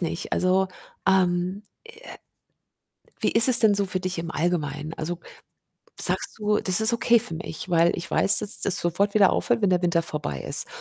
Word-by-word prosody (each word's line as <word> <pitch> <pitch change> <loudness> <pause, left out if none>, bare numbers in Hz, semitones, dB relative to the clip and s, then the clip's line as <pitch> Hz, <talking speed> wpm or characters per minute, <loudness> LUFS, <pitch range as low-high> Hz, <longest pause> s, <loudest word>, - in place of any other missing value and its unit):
nicht. 170 -1 -6
Also, 185 +1 -1 0.4
ähm, 185 0 -2 0.4
äh - - -13 1.1
wie - - -1
ist 230 +3 +6
es 255 - +11
denn 215 -3 +5
so 200 0 +1
für 185 0 -5
dich 185 -1 -6
im 165 0 -7
Allgemeinen? 155 -2 -5
Also, 170 +2 -7 0.8
sagst - - +4
du: 210 -1 -2
„Das 185 +3 +2
ist 220 +2 +6
okay 235 0 +1
für 165 - -8
mich, 160 +1 -9
weil 170 0 +1
ich 170 - -9
weiß, 200 - +4
dass 210 +1 -3
das 200 - -1
sofort 195 +4 -3
wieder 200 -3 +2
aufhört, - - -3
wenn 200 - 0
der 180 -1 -1
Winter 170 -1 -1
vorbei 150 - -7
ist?“ - - -6
185 Hz, 190 wpm, -22 LUFS, 170-200 Hz, 1.1 s, es